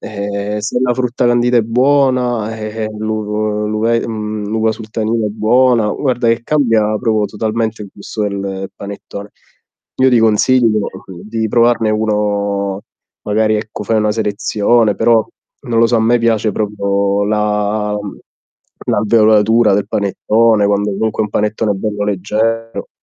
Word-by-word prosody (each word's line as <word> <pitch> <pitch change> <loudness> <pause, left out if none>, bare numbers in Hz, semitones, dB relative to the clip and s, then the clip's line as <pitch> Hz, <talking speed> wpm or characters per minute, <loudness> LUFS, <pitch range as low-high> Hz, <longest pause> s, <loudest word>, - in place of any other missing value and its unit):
Ehm, 100 0 -4
se 115 - -2
la 125 -1 +2
frutta 125 -1 -1
candita 120 0 +2
è - - +3
buona, 125 -2 +1
eh, 110 - -6 0.2
eh, - - -3
l'u 105 -1 -2
l'uve 115 +2 0
mhmm, 105 -2 -4
l'uva 110 0 0
sultanina 110 0 -3
è - - -3
buona, 115 +1 +2
guarda 125 -4 -1
che 115 0 +1
cambia 115 -8 +1
proprio 110 -3 0
totalmente 110 +1 -3
il 100 - -9
gusto 105 +2 -6
del 95 -1 -4
panettone. 100 0 -9 0.7
Io 130 0 +4
ti 120 - +4
consiglio, 115 +1 +3 0.3
uhm, 90 -2 -10
di 110 +1 -3
provarne 115 -1 +2
uno 100 -2 -1 0.4
magari 110 +1 +1
ecco 105 -1 -6
fai 110 +1 +1
una 105 0 +1
selezione, 110 +1 +1
però 115 -2 +3 0.4
non 115 -1 -1
lo 115 - +5
so, 120 - 0
a - - +2
me 120 +2 +3
piace 115 -2 +1
proprio 100 -1 -1
la 105 0 0
uhm, 105 -1 -8 0.7
l'alveolatura 110 -1 +3
del 100 - 0
panettone, 105 +1 +2
quando 100 0 +1
comunque 110 +2 -2
è - - 0
un - - -14
panettone 105 0 0
bello 105 +1 -3
leggero. 110 +3 -2
110 Hz, 150 wpm, -15 LUFS, 105-115 Hz, 0.7 s, lo